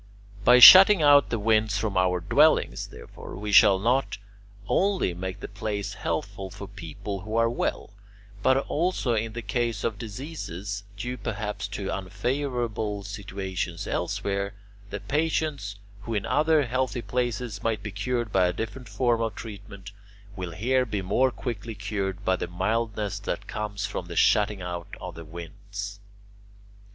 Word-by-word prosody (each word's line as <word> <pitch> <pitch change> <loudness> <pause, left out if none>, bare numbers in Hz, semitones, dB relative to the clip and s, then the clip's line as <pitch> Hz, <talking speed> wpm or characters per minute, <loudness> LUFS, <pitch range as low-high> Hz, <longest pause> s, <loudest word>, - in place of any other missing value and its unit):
3. 100 - -14
By 125 - +8
shutting 185 +6 +11
out 145 -1 +6
the 115 - -1
winds 110 0 +2
from 105 -1 -2
our 90 -1 +2
dwellings, 150 - +3
therefore, - - -11
we 105 +1 -4
shall 100 -2 +7
not 125 +7 +1 0.5
only 195 - +1
make 95 +1 -6
the - - -5
place 100 -1 -4
healthful 95 +1 -4
for 100 +2 -9
people 100 0 -6
who 110 +3 -5
are 115 0 +4
well, 120 - -2 0.5
but 130 +5 +4
also 160 -6 0
in 110 0 -1
the 120 0 -5
case 115 +1 -1
of 105 -3 -2
diseases 105 - -6
due 125 +4 -4
perhaps 105 -2 -4
to 100 -1 -4
unfavourable 110 +1 -2
situations 95 -3 -5
elsewhere, 100 0 -2 0.3
the 105 - -5
patients, 145 -4 -1 0.3
who 115 +1 -4
in 100 -2 -1
other 155 0 +3
healthy 125 0 -1
places 120 -3 -2
might 110 -3 -1
be 105 - -5
cured 120 +3 -2
by 95 -2 +3
a 90 - -1
different 115 +3 -6
form 115 +2 +1
of 110 -3 -2
treatment, 100 -3 -9 0.4
will 90 -4 -5
here 125 +8 +1
be 105 -5 -3
more 130 +8 +2
quickly 115 -1 -5
cured 100 -1 -4
by 95 - +3
the 90 - -4
mildness 105 +2 -2
that 100 0 -4
comes 105 -2 -4
from 95 -2 -5
the 85 - -7
shutting 105 0 +3
out 90 -1 -5
of - - -7
the 85 - -9
winds. 100 +5 -8
105 Hz, 155 wpm, -26 LUFS, 100-120 Hz, 0.5 s, shutting